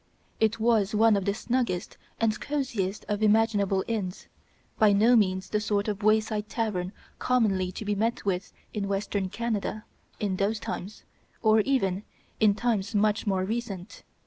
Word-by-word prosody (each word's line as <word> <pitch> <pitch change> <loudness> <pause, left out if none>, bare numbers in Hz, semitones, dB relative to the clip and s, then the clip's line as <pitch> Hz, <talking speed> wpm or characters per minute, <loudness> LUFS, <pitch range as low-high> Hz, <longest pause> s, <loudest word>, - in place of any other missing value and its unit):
It 220 0 +2
was 220 -3 +2
one 220 0 +5
of 195 -2 -1
the 200 - +1
snuggest 235 -7 -1 0.2
and 220 -2 +1
cosiest 230 -9 -2
of 210 0 -2
imaginable 210 -3 +3
inns; 205 -5 -3 0.5
by 215 -2 +6
no 225 +5 +5
means 190 -4 +2
the 210 - +2
sort 205 -1 0
of 210 -1 -2
wayside 215 0 +1
tavern 190 -6 -2 0.3
commonly 200 -7 +1
to 215 - -6
be 205 - 0
met 225 +3 -1
with 185 -1 -1 0.2
in 205 -2 -2
Western 195 -1 -1
Canada 215 -1 -3 0.3
in 195 -3 -1
those 210 +3 0
times, 195 +1 -6 0.4
or 220 0 +5
even 200 -6 +1 0.4
in 210 -2 +4
times 215 -4 -1
much 210 +1 +2
more 190 -2 +1
recent. 215 -3 -5
210 Hz, 155 wpm, -27 LUFS, 195-225 Hz, 0.5 s, by